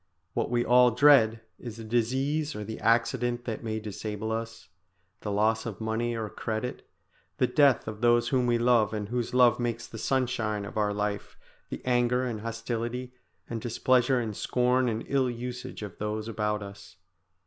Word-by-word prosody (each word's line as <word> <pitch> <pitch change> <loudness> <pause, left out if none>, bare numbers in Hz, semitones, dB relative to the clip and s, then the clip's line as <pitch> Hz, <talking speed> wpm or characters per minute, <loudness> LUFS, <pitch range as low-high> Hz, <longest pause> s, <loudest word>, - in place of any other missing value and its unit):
What - - -1
we 120 0 +1
all 125 0 +6
dread 120 -3 +5 0.2
is 115 -3 -8
the 115 - -8
disease 130 +7 0
or 105 - -4
the 110 +2 -6
accident 120 +1 +1
that 115 -3 -4
may 110 -1 -2
disable 105 +1 -5
us, 115 -1 -5 0.5
the 105 - -4
loss 110 +3 +1
of 105 -5 -6
money 115 +2 -1
or 110 -1 -3
credit, 110 +3 -5 0.5
the - - +3
death 140 -3 +3
of 110 0 -6
those 120 0 +3
whom 125 -2 +2
we 120 -1 +3
love 115 -3 +3
and 105 -1 -4
whose 120 0 -2
love 125 -2 +5
makes 120 -1 -2
the 115 - -9
sunshine 110 -5 -1
of - - -9
our 105 -1 +1
life, 105 0 -3 0.3
the - - -7
anger 125 0 +2
and 115 -4 -4
hostility 115 +2 -4 0.3
and 115 -1 -4
displeasure 125 +1 +2
and 110 -3 -3
scorn 125 +2 +1
and 110 0 -3
ill 135 -2 +1
usage 125 -1 -6
of 105 - -8
those 105 +1 -3
about 105 -2 -1
us. 100 0 -12
115 Hz, 175 wpm, -28 LUFS, 110-125 Hz, 0.5 s, all